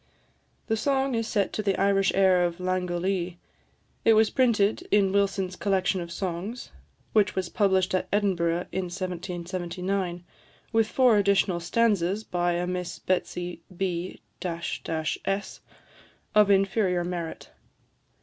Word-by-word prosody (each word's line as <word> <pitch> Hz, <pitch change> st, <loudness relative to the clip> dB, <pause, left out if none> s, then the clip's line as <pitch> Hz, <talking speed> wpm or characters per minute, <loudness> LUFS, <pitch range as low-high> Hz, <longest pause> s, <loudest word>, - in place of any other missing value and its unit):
The 220 Hz, -, 0 dB
song 270 Hz, +3 st, 0 dB
is 230 Hz, -1 st, -1 dB
set 205 Hz, -4 st, 0 dB
to -, -, -1 dB
the 200 Hz, -2 st, 0 dB
Irish 195 Hz, 0 st, +3 dB
air 190 Hz, -2 st, +4 dB
of 170 Hz, -1 st, -1 dB
"Langolee." 180 Hz, 0 st, -1 dB, 0.7 s
It 225 Hz, -, +6 dB
was 220 Hz, 0 st, +4 dB
printed 225 Hz, -5 st, +2 dB
in 200 Hz, -2 st, +3 dB
Wilson's 195 Hz, -2 st, 0 dB
Collection 190 Hz, -1 st, 0 dB
of 170 Hz, 0 st, -7 dB
Songs, 190 Hz, +6 st, -4 dB, 0.4 s
which 210 Hz, -1 st, +3 dB
was 185 Hz, -2 st, -2 dB
published 190 Hz, -3 st, +2 dB
at 185 Hz, -, 0 dB
Edinburgh 175 Hz, -4 st, +1 dB
in 190 Hz, -1 st, -2 dB
1779, 180 Hz, 0 st, -3 dB, 0.5 s
with 225 Hz, -1 st, +3 dB
four 250 Hz, -5 st, +4 dB
additional 195 Hz, -3 st, +2 dB
stanzas 200 Hz, +1 st, +1 dB
by 175 Hz, -3 st, 0 dB
a 175 Hz, +1 st, -1 dB
Miss 180 Hz, -1 st, -4 dB
Betsy 180 Hz, -2 st, -2 dB, 0.2 s
B 180 Hz, -1 st, -2 dB, 0.2 s
s, 165 Hz, -2 st, -3 dB, 1.1 s
of 210 Hz, -1 st, +5 dB
inferior 195 Hz, -2 st, +2 dB
merit. 175 Hz, -2 st, -5 dB
185 Hz, 125 wpm, -26 LUFS, 175-200 Hz, 1.1 s, It